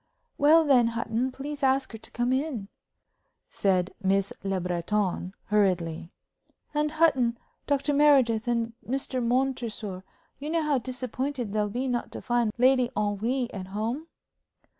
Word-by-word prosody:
"Well, 315 +3 +6
then, 260 -6 +5
Hutton, 230 +2 -1
please 285 +3 -6
ask 265 0 +2
her 225 - -7
to - - -11
come 245 +2 0
in," 260 -7 -2 0.8
said 185 -2 +1
Miss 195 0 +1
Le 195 -1 -1
Breton, 180 +1 -1
hurriedly. 180 -5 0 0.6
"And, 300 0 0
Hutton, 265 -8 +3 0.3
Dr. 285 0 +1
Meredith 265 -6 +4
and 230 -1 0
Mr. 260 0 -2
Montresor, 235 -6 -1 0.4
you 290 +2 -5
know 330 0 +1
how 295 -3 +2
disappointed 255 -1 -3
they'll 210 -1 +1
be 250 +5 -2
not 245 -2 -2
to - - -6
find 240 -3 +1
Lady 255 0 +4
Henry 215 +5 0
at 185 -2 -6
home?" 225 +10 -3
240 Hz, 140 wpm, -27 LUFS, 210-270 Hz, 0.8 s, Well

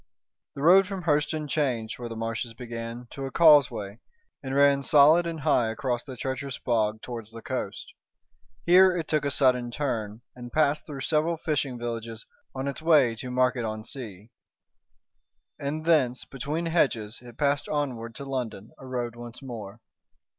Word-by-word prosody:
The 140 - -5
road 185 +4 +7
from 195 -2 -5
Hurseton 150 -1 0
changed 125 -8 -1
where 120 -1 -5
the 115 - -6
marshes 115 +1 -4
began 115 0 -7
to 135 -1 -5
a - - -8
causeway 135 -11 +4 0.4
and 135 -1 -4
ran 140 0 +5
solid 150 +5 +5
and 165 -2 -5
high 130 -6 +2
across 120 +1 -2
the 130 -3 -9
treacherous 130 +2 -4
bog 110 -3 0
towards 115 -3 -7
the 115 0 -10
coast. 125 -7 -5 0.7
Here 180 +1 +6
it 160 -2 -3
took 150 -2 +1
a - - +1
sudden 125 -3 +2
turn, 115 -5 -3
and 120 -1 -9
passed 150 0 +1
through 140 -3 -7
several 160 +4 +1
fishing 145 -5 -2
villages 115 -1 -5 0.3
on 135 +1 -3
its 140 - -4
way 150 -7 +4
to 125 - -6
Market 125 -1 +1
on 110 -1 -4
Sea. 110 -4 -8 1.3
And 150 +3 -4
thence 135 -7 +2
between 150 +5 -4
hedges 120 -10 0
it 120 -2 -13
passed 140 -1 0
onward 125 -6 -3
to 140 - -7
London, 125 -6 -4
a 130 - -11
road 120 -2 -3
once 120 +2 -10
more. 110 -4 -8
130 Hz, 165 wpm, -27 LUFS, 115-150 Hz, 1.3 s, road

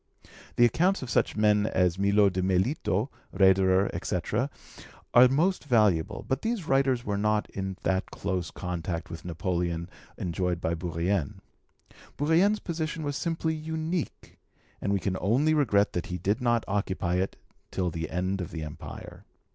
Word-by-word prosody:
The 120 - +6
accounts 175 - +2
of 125 - -6
such - - +1
men 105 0 +3
as 90 -3 +1
Miot 100 0 +4
de 95 - 0
Melito, 95 - 0 0.2
Raederer, 95 0 +4
etc., - - -1 0.6
are 125 +1 +8
most 160 +7 +1
valuable, 105 - +2
but 130 0 -1
these 225 -6 -2
writers 135 -4 +2
were 100 -1 -1
not 105 0 +1
in 95 -1 -4
that 95 0 0
close 95 -3 -3
contact 85 -1 -4
with 80 - -7
Napoleon 85 -1 -2 0.3
enjoyed 90 0 -1
by 85 -1 -1
Bourrienne. 85 -1 -1 0.8
Bourrienne's 170 +9 +3
position 160 -3 -4
was 145 -1 -2
simply 165 0 -1
unique, 160 +1 -4 0.4
and 100 - -1
we 100 - +2
can 95 0 -2
only 130 - +3
regret 105 -9 +3
that 90 - -3
he 90 - -3
did 100 +8 -1
not 120 -2 +2
occupy 95 -3 -1
it 95 +1 -1 0.3
till 90 -2 -1
the 80 -1 -4
end 95 +2 -1
of 90 - -5
the 80 -2 -5
Empire. 75 -1 -9
100 Hz, 155 wpm, -28 LUFS, 90-135 Hz, 0.8 s, are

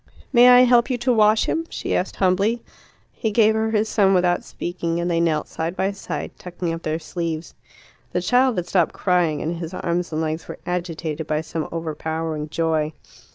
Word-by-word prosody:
"May 245 0 +8
I 250 0 +8
help 245 0 +4
you 250 - 0
to 245 +1 +1
wash 215 -1 +4
him?" 330 0 -1
she - - -3
asked 185 - -1
humbly. 200 +5 +1 0.5
He 220 - -2
gave 220 0 +4
her 220 0 0
his 220 0 +1
son 195 -3 +3
without 180 -1 +2
speaking, 170 -1 -3
and 175 +1 -1
they 165 - +1
knelt 160 -3 +1
side 165 +2 -4
by 195 +1 0
side, 195 - -5
tucking 175 -1 -4
up 165 - -5
their 155 -1 -2
sleeves. 165 0 -4 0.6
The - - 0
child 250 -2 +2
had 175 - -1
stopped 175 -2 +1
crying, 175 -5 +1
and 165 +2 -2
his 165 +1 -6
arms 175 0 -2
and 155 - -2
legs 160 0 -3
were - - -7
agitated 165 -3 -3
by 155 0 0
some 160 0 -4
overpowering 160 -1 -3
joy. 160 -1 0
175 Hz, 195 wpm, -22 LUFS, 160-210 Hz, 0.6 s, May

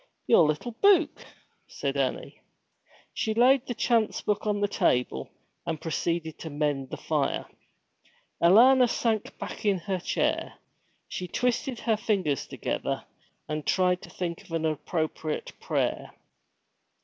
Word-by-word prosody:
'Your 170 -9 +6
little 155 +11 -2
buke,' 380 -6 +4 0.4
said - - -3
Annie. - - -2 0.7
She 220 -1 -1
laid 255 +3 +4
the 245 - -3
chance 230 -2 +1
book 210 +1 -1
on 205 -1 +1
the 205 - +2
table, 125 - 0 0.3
and 165 -3 -3
proceeded 165 0 -2
to 160 - -6
mend 145 -3 -1
the - - -5
fire. - - -1 1.0
Alanna 245 +9 +7
sank 220 -3 -1
back - - -7
in 200 -2 +3
her 185 +1 -3
chair. - - -1 0.5
She 180 - -5
twisted 250 +3 -1
her 220 -2 +1
fingers 190 - 0
together, - - -3 0.4
and 155 0 -3
tried 180 +1 +2
to - - -11
think 175 0 -4
of 185 - -18
an 165 -1 0
appropriate 155 0 -2
prayer. - - -1
185 Hz, 135 wpm, -27 LUFS, 160-230 Hz, 1.0 s, Alanna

